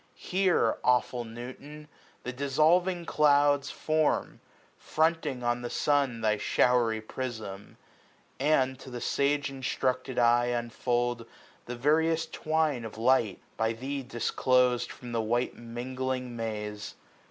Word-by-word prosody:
Here, 185 -1 +1
awful 125 -1 +1
Newton! 130 +6 -9 0.4
the 125 - -4
dissolving 165 +7 +2
clouds 145 -2 +3
Form, 155 -1 0 0.4
fronting 155 -5 0
on 120 0 0
the 120 - -4
sun, 140 -5 +1
thy 110 -1 +2
showery 120 0 +2
prism 110 -4 -7 0.6
j 140 - 0
And 130 -4 +2
to - - -10
the 125 - -6
sagc 145 +3 +1
instructed 130 -1 -2
eye 120 0 +4
unfold 120 0 -1 0.4
The 125 - -4
various 160 +5 +2
twine 155 -5 -1
of 110 -1 -8
light, 115 -4 +2 0.2
by 110 +1 +1
thee 135 +4 -4
disclosed 125 0 +1
210 - - -10
From 120 -1 -9
the 115 -1 0
white 120 +3 -1
mingling 125 +1 -4
maze. 105 -2 -5
125 Hz, 125 wpm, -29 LUFS, 120-145 Hz, 0.6 s, eye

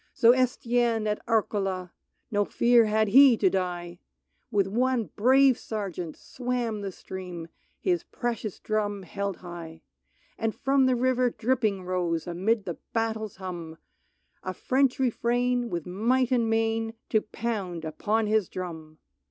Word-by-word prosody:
So 230 - +7
Estienne 240 -3 +1
at 210 0 -1
Areola 195 -5 0 0.2
— - - -49
No 205 -1 +2
fear 235 +2 +4
had 215 0 +2
he 260 +1 +7
to 190 -4 +3
die! 175 -2 -3 0.3
— - - -48
With 200 -3 +3
one 235 - 0
brave 260 +3 +5
Sergeant, 185 -7 -5
swam 245 -4 -3
the 195 -1 -4
stream, 180 -3 -8 0.3
His 355 -2 0
precious 230 - -4
drum 205 -2 -2
held 200 +2 -4
high. 165 -2 -9 0.6
And 225 -1 -1
from 270 0 +2
the 255 - +3
river 250 0 +2
dripping 220 -4 0
rose 175 -3 -1
Amid 195 +5 0
the 175 - -5
battle's 220 -2 -1
hum, 175 -4 -7 0.6
A 185 0 -5
French 265 0 +1
refrain, 245 -1 +1
with 170 -5 -3
might 235 +8 +1
and 235 -3 +2
main, 225 0 0
To 215 - +3
pound 200 -8 -4
upon 215 +8 0
his 215 -3 +1
drum. 160 -4 -7
215 Hz, 145 wpm, -27 LUFS, 185-240 Hz, 0.6 s, So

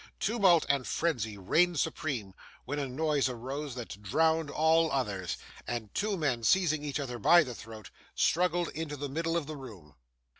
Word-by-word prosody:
Tumult 195 -7 +4
and 140 -2 +1
frenzy 115 -11 -1
reigned 165 - +2
supreme; 120 - -2 0.3
when 145 +3 -3
a 140 - -2
noise 145 0 +1
arose 130 +3 -5
that 110 -5 -7
drowned 160 +8 +2
all 160 +2 +3
others, 100 -10 -2 0.3
and 110 -3 -4
two 205 0 -1
men, 140 -8 0
seizing 155 0 +3
each 145 -1 -2
other 125 -4 -4
by 170 +10 +6
the 125 -4 -6
throat, 110 -1 -10 0.2
struggled 175 0 +2
into 150 -1 -5
the 145 0 -4
middle 165 +4 -1
of 165 - -2
the 155 +1 -6
room. 105 - -11
145 Hz, 165 wpm, -30 LUFS, 120-165 Hz, 0.3 s, by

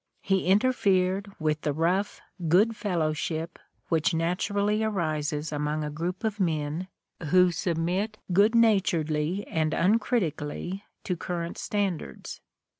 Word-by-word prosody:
He 190 -2 +1
interfered 195 -3 +2
with 155 -1 0
the 150 - -1
rough 175 +6 0 0.3
geod 205 +8 +4
fellowship 165 -3 -2 0.3
which 165 +1 +2
naturally 200 +5 0
arises 155 -7 -1
among 150 +1 -1
a 150 - -3
group 175 +5 -4
of 215 -1 -1
men 160 0 -1 0.4
who 180 +3 +5
sub 170 0 -1
mit 190 +6 -1 0.2
good 205 +5 +4
naturedly 180 -5 +2
and 155 -1 0
uncritically 190 - 0 0.2
to 180 - -1
current 170 0 -4
stand 200 -5 -1
ards. - - -9
180 Hz, 120 wpm, -27 LUFS, 155-200 Hz, 0.4 s, who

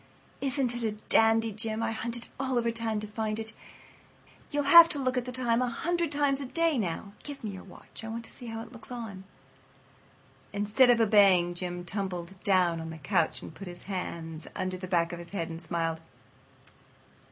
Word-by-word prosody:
"Isn't 270 -2 0
it 240 - -3
a 220 -2 0 0.2
dandy, 225 0 +4
Jim? 220 +1 -1
I 225 - 0
hunted 235 +1 -3
all 260 -2 0
over 235 -1 +1
town 225 -2 -1
to 215 - -5
find 215 0 -2
it. 220 0 -2 1.0
You'll 290 -1 0
have 335 +4 +10
to - - +2
look 255 -1 0
at 250 -1 0
the 250 - -5
time 240 -1 +1
a 250 - +1
hundred 340 +4 -1
times 285 -1 +1
a 270 - -4
day 330 -1 +2
now. 200 +1 -3
Give 285 -3 -8
me 215 - -3
your 190 -1 -9
watch. 195 - -12
I - - -5
want 230 +1 -5
to - - -12
see 245 - -7
how 225 0 -5
it 230 - -13
looks 235 -3 -11
on 230 -5 -6 1.3
it." 205 - -7
Instead 210 +5 +4
of 240 -1 +5
obeying, 200 -5 +5
Jim 175 0 -4
tumbled 190 -1 -4
down 180 -4 +3
on 160 - -6
the 160 - -7
couch 145 -3 0
and - - -9
put 195 +4 -9
his 175 0 -8
hands 165 -4 -5
under 185 -1 -2
the 185 0 -6
back 170 -1 +1
of 175 - -6
his 170 +2 -10
head 170 -4 -2
and 165 0 -7
smiled. 165 -2 -2
220 Hz, 210 wpm, -29 LUFS, 180-245 Hz, 1.3 s, have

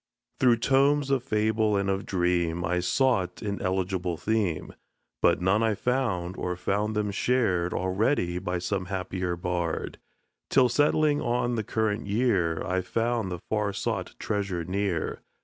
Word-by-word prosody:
Through 125 -2 +5
tomes 140 +3 +3
of 135 -3 +2
fable 110 -3 +1
and 100 0 0
of 95 0 -1
dream 90 -2 0
I 90 +2 0
sought 90 0 +1
an 100 -1 -3
eligible 95 -2 -1
theme; 95 -4 -1 0.5
But - - +3
none 95 +4 +3
I 110 -2 +2
found, 100 -8 -1
or 90 0 -2
found 105 +4 -1
them 105 -1 0
shared 95 -6 +1
Already 95 -1 0
by 90 0 -2
some 90 +2 -2
happier 95 -1 -3
bard, 85 -1 -3 0.5
Till 130 -2 +4
settling 145 +3 +3
on 120 -1 0
the 110 -2 -1
current 110 0 -1
year 100 -7 +1
I 95 +1 0
found 115 -1 -1
the 90 0 -5
far 105 -2 0
sought 100 -3 -3
treasure 100 -5 -2
near. 95 -2 -2
100 Hz, 150 wpm, -27 LUFS, 90-115 Hz, 0.5 s, Through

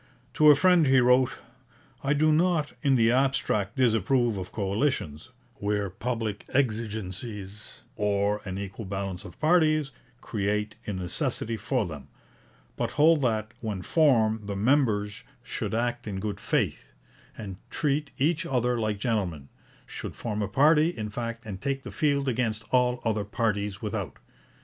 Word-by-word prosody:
To 155 0 +6
a 145 - +9
friend 180 0 +4
he 130 0 +5
wrote: 125 +1 +4 0.7
'I 140 - +2
do 155 +1 +3
not 160 -1 +2
in 140 -3 +3
the 115 -2 +4
abstract 125 -6 +1
disapprove 120 -1 +2
of 90 -2 -6
coalitions, 100 - -1 0.3
where 100 -1 -1
public 110 0 -3
exigencies, 105 -4 -3
or 105 0 0
an 95 -1 -5
equal 100 +2 -6
balance 95 0 -4
of - - -12
parties, 155 -3 +3 0.3
create 105 -1 -2
a 105 - -2
necessity 95 +5 -2
for 110 +2 -1
them, 75 -6 -8 0.7
but - - -2
hold 155 +1 +5
that, 110 -4 0
when 105 -5 -4
formed, 110 - +3
the 100 - -3
members 105 -3 +1 0.2
should 110 -2 -3
act 120 0 -1
in 95 -2 -3
good 105 +1 -4
faith, - - -1 0.4
and 100 -4 -7
treat 150 -1 0
each 160 +5 +1
other 125 -5 0
like 110 -2 -1
gentlemen 95 - -2 0.4
should - - -7
form 105 -2 -3
a 100 - 0
party, 150 - +4
in 110 -10 -5
fact, 115 +1 -5
and 100 -3 -7
take 135 +1 -2
the - - -7
field 140 -3 +1
against 115 -3 -1
all 125 -1 +2
other 110 -2 +1
parties 105 0 -2
without. 100 -8 -4
110 Hz, 150 wpm, -27 LUFS, 100-135 Hz, 0.7 s, a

